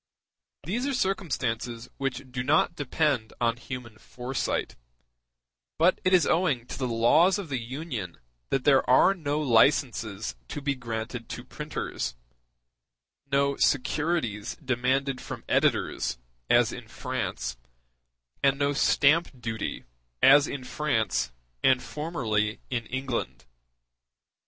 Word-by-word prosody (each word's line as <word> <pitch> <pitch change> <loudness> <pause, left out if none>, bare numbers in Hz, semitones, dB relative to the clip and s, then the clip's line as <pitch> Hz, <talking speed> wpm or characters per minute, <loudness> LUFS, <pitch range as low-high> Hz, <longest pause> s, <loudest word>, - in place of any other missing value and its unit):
These 230 - -2
are 280 - 0
circumstances 125 - -2
which 135 0 -2
do 125 0 -2
not 150 +6 +2
depend 145 -5 0
on 115 0 +1
human 120 -4 -8
foresight; 125 +1 -3 1.0
but 170 +4 +3
it 185 - +2
is 180 -5 +5
owing 160 -8 +1
to - - -7
the 130 - 0
laws 125 - +4
of 195 -6 -6
the 135 -3 -1
Union 120 - -5 0.3
that 135 -2 0
there 135 -2 +5
are 130 +9 +6
no 150 -5 -2
licenses 115 -5 +2
to - - -5
be 140 0 0
granted 115 -1 -5
to - - -6
printers, - - -4 1.2
no 140 0 +2
securities 130 -5 0
demanded 130 +2 0
from - - -7
editors - - +1 0.3
as - - +4
in - - -8
France, 65 +1 -4 0.8
and 140 0 +3
no 140 0 +1
stamp 145 0 +3
duty 115 -2 -4 0.4
as 145 +2 +7
in 140 -2 -5
France 120 - 0 0.3
and 130 -1 +4
formerly 110 -10 -1
in 120 -3 -2
England. 125 - -3
130 Hz, 120 wpm, -27 LUFS, 115-150 Hz, 1.2 s, as